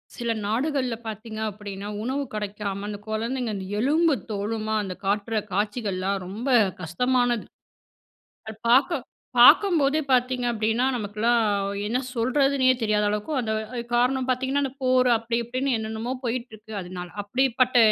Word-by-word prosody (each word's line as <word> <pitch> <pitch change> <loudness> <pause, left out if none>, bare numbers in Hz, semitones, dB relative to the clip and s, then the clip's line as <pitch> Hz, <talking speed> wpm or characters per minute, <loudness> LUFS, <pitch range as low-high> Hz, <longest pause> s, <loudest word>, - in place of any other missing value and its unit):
சில 235 -2 -2
நாடுகள்ல 255 +2 0
பார்த்தீங்க 220 0 -6
அப்டின்னா, 205 -1 -7 0.2
உணவு 265 +4 -1
கிடைக்காம 205 -1 -4
அந்த 210 -1 -4
குழந்தைங்க 230 +2 -2
அந்த 190 -1 -5
எலும்பு 310 +6 +3 0.2
தோலுமா 215 +1 -2
அந்த 190 -2 -4
காட்டுற 205 +3 0 0.2
காட்சிகள்லாம் 200 -2 -1
ரொம்ப 220 +8 -4 0.3
கஷ்டமானது. 245 +7 +1 1.0
அது 220 -1 -7
பார்க்க 270 +7 +4 0.4
பார்க்கும்போதே 315 -7 +6
பார்த்தீங்க 250 0 +2
அப்டின்னா, 225 +3 +1
நமக்கெல்லாம் 225 +2 +1 0.4
என்ன 235 +4 0 0.2
சொல்றதுன்னே 260 +2 +3
தெரியாத 210 -1 +2
அளவுக்கு 210 +8 -3
அந்த 220 -3 -2 0.4
காரணம் 255 +2 +2
பாத்தீங்கன்னா, 265 +2 0
அந்த 265 - -3
போர் 255 0 +4
அப்டி 230 +1 -2
இப்டின்னு 255 +2 -1
என்னென்னமோ 220 +2 -4
போயிட்டுருக்கு 230 -3 -5
அதனால. 180 0 -7
அப்டிப்பட்ட 255 +3 +2
230 Hz, 125 wpm, -25 LUFS, 210-255 Hz, 1.0 s, பார்க்கும்போதே